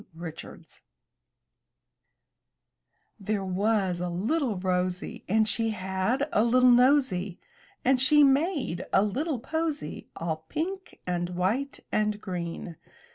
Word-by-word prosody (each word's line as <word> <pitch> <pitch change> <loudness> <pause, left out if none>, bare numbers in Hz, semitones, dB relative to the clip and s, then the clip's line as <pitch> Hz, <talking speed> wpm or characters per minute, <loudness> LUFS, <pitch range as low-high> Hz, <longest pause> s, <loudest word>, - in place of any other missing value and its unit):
Richards 165 -1 -10 2.4
There 200 0 -2
was 190 -1 0
a 180 - -2
little 225 - 0
Rosy, 180 -1 -2
And 220 +2 +3
she 225 +1 +1
had 190 +7 -1
a 215 - +4
little 250 +2 +5
nosy, 245 -8 +3 0.5
And 255 0 +4
she 295 +3 +6
made 280 - +1
a 195 - +4
little 270 - -1
posy. 310 - -3
All 160 -1 -2
pink 375 +5 -4
and 175 -1 -1
white 200 +11 -1
and 210 -1 0
green. 175 -4 -5
210 Hz, 110 wpm, -27 LUFS, 180-265 Hz, 2.4 s, she